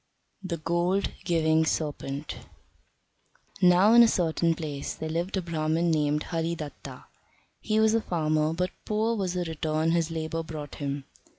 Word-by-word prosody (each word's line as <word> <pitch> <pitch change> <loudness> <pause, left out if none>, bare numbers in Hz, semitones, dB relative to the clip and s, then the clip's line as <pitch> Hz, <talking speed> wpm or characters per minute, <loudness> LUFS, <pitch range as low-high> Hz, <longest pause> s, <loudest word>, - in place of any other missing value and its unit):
The 185 -3 -3
Gold 175 +5 0
giving 160 -2 +3
Serpent 150 -2 -3 1.2
Now 180 +4 +6
in 235 - +9
a 235 - +8
certain 165 -4 +1
place 150 -4 -5
there 160 - -5
lived 175 +4 -2
a 190 - -1
Brahman 165 0 0
named 150 -1 +1
Haridatta. 165 -3 -4 0.6
He 215 0 0
was 220 0 +4
a 225 - +2
farmer, 155 -4 0
but 180 +3 -1
poor 220 +2 0
was 190 -4 -2
the 180 - 0
return 160 -1 -1
his 165 -1 +1
labour 165 0 -3
brought 155 -2 -7
him. 140 0 -3
165 Hz, 150 wpm, -27 LUFS, 155-180 Hz, 1.2 s, in